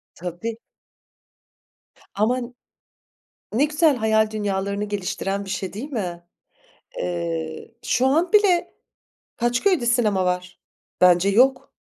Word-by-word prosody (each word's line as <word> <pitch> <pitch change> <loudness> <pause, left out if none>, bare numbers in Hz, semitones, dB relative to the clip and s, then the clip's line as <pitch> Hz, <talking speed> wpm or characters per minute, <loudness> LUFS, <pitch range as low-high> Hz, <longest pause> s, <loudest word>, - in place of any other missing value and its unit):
Tabii. 180 +6 -5 1.6
Ama 225 +5 +1 1.1
ne 260 +7 +3
güzel 305 -1 +3
hayal 220 -1 +2
dünyalarını 200 -1 -2
geliştiren 200 0 -3
bir - - -9
şey 190 0 -4
değil 265 +9 -6
mi? 180 -8 -4 0.8
Eee, 170 +3 -4
şu 255 - +2
an 325 +6 +2
bile 400 -5 +3 0.6
kaç 240 +1 0
köyde 360 -12 +2
sinema 215 -6 +2
var? 180 0 -3 0.4
Bence 180 +1 +5
yok. 255 +6 +3
215 Hz, 105 wpm, -23 LUFS, 185-255 Hz, 1.6 s, Bence